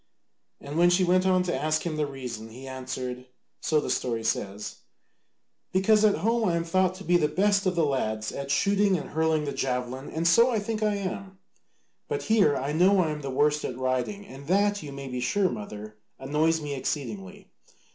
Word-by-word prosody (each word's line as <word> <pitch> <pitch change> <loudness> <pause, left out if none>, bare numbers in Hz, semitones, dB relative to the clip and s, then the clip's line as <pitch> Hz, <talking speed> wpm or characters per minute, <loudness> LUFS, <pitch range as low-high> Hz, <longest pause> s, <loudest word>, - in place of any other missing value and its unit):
And 145 +3 -4
when 175 0 +6
she 180 +1 +3
went 185 +1 +3
on 185 -1 +3
to 175 -1 -1
ask 155 +3 0
him 165 -3 -3
the 150 -1 0
reason, 125 -5 -7
he 130 +4 -10
answered, 130 -1 -5 0.3
so 155 - +2
the - - -2
story 115 -3 -1
says, 105 -2 -3 0.9
"Because 210 +3 +4
at 210 -1 +5
home 230 -3 +2
I 170 - +1
am 170 - 0
thought 185 +2 +1
to 195 - -10
be 175 -1 +4
the 155 - +2
best 200 +5 +2
of 185 - +1
the 165 -2 +3
lads 110 -6 -1
at 140 0 -6
shooting 195 +6 +3
and 150 - -7
hurling 160 -1 +1
the 140 - -2
javelin, 130 +1 -3
and 165 +1 -1
so 230 +9 +6
I 235 - +1
think 215 +1 -3
I 210 -1 +2
am: 195 -1 -5 0.7
but 445 -2 -2
here 200 -10 +3
I 135 +2 -2
know 185 +5 +4
I 165 -4 +2
am 150 0 -5
the 140 - -5
worst 150 +3 +2
at 125 - -4
riding, 130 +11 -2
and 140 -5 -11
that 205 +3 +2
you 145 - -8
may 140 0 -7
be 125 -1 -4
sure, 185 +10 +1
mother, 105 -1 -7 0.2
annoys 155 +4 +1
me 145 -1 -4
exceedingly. 120 - -5
155 Hz, 205 wpm, -27 LUFS, 130-190 Hz, 0.9 s, when